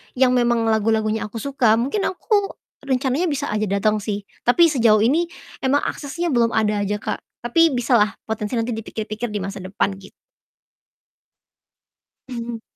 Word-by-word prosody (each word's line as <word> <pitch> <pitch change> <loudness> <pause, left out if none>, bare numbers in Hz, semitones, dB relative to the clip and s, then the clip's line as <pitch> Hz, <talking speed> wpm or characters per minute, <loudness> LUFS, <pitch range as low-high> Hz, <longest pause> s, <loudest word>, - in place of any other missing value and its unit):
yang 255 0 +4
memang 240 -2 +2
lagu-lagunya 220 0 +1
aku 210 - -17
suka, 260 -5 +2
mungkin 275 - 0
aku 405 +1 0 0.3
rencananya 265 +5 +1
bisa 285 -4 -2
aja 215 0 0
datang 205 +2 +1
sih. 205 0 -4 0.2
Tapi 330 +6 +5
sejauh 225 -6 +4
ini 315 +9 +2 0.3
emang 275 +2 +1
aksesnya 335 +4 -3
belum 235 -2 +3
ada 210 -1 +1
aja, 205 +1 -1
Kak, - - -3 0.2
tapi 325 +6 +4
bisalah 235 -3 +2
potensi 215 +1 -3
nanti 230 +1 -1
dipikir-pikir 220 0 -4
di 210 -1 -3
masa 195 +1 -5
depan 190 +1 -1
git 195 - -14 2.2
Hmm. 235 -2 -5
230 Hz, 145 wpm, -21 LUFS, 215-270 Hz, 2.2 s, Tapi